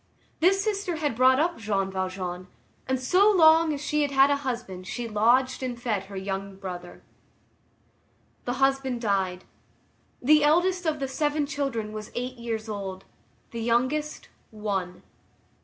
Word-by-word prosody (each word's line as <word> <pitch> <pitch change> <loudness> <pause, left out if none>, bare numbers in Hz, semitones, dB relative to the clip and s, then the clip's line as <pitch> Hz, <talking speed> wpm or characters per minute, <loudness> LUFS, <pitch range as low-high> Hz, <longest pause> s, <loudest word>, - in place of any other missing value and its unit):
This 385 +4 +3
sister 400 -4 -1
had 295 -6 -1
brought 260 +2 +5
up 335 -1 0
Jean 195 -3 -1
Valjean, 185 -1 -4 0.4
and 260 0 0
so 370 +11 +4
long 325 -4 +6
as 290 - -3
she 300 +1 0
had 280 -1 +4
a 285 - +2
husband 235 -9 -5
she 240 +3 -4
lodged 240 +5 +2
and 250 -2 -4
fed 215 -5 -2
her 195 0 -9
young 195 0 -4
brother. 180 -2 -8 1.4
The 245 - -1
husband 270 -1 +1
died. 190 -5 -1 0.8
The 300 +3 +4
eldest 355 +4 +2
of 305 -1 0
the 270 - -1
seven 295 +2 0
children 275 -7 -3
was 215 0 -7
eight 250 +1 -4
years 230 -2 -4
old. 195 -3 -6 0.5
The 230 - -5
youngest, 260 +7 -1 0.2
one. 195 -4 -4
245 Hz, 145 wpm, -26 LUFS, 200-295 Hz, 1.4 s, long